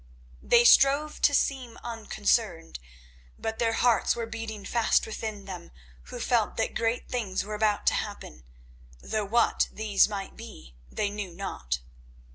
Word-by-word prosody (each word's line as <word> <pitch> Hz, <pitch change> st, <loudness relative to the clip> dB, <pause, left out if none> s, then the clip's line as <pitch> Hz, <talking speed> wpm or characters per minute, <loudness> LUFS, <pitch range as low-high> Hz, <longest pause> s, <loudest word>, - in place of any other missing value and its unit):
They 240 Hz, 0 st, +5 dB
strove 285 Hz, +4 st, +5 dB
to -, -, +5 dB
seem 255 Hz, -5 st, -1 dB
unconcerned, 215 Hz, -, -1 dB, 0.6 s
but 225 Hz, 0 st, -4 dB
their 230 Hz, -1 st, +2 dB
hearts 235 Hz, 0 st, +3 dB
were 235 Hz, -1 st, -3 dB
beating 225 Hz, -2 st, -6 dB
fast 235 Hz, -2 st, +2 dB
within 215 Hz, -2 st, -6 dB
them 180 Hz, -3 st, -8 dB, 0.4 s
who -, -, -8 dB
felt -, -, +1 dB
that -, -, -1 dB
great 230 Hz, +1 st, -1 dB
things 215 Hz, -7 st, -2 dB
were 210 Hz, -, -6 dB
about 210 Hz, -1 st, +1 dB
to -, -, +4 dB
happen, -, -, -5 dB, 0.6 s
though 215 Hz, -2 st, -2 dB
what 230 Hz, +4 st, +2 dB
these 210 Hz, -2 st, +2 dB
might 200 Hz, -2 st, -6 dB
be 60 Hz, -1 st, -11 dB, 0.2 s
they 205 Hz, -1 st, -1 dB
knew 205 Hz, -2 st, -5 dB
not. 65 Hz, -, -4 dB
220 Hz, 145 wpm, -27 LUFS, 200-230 Hz, 0.6 s, They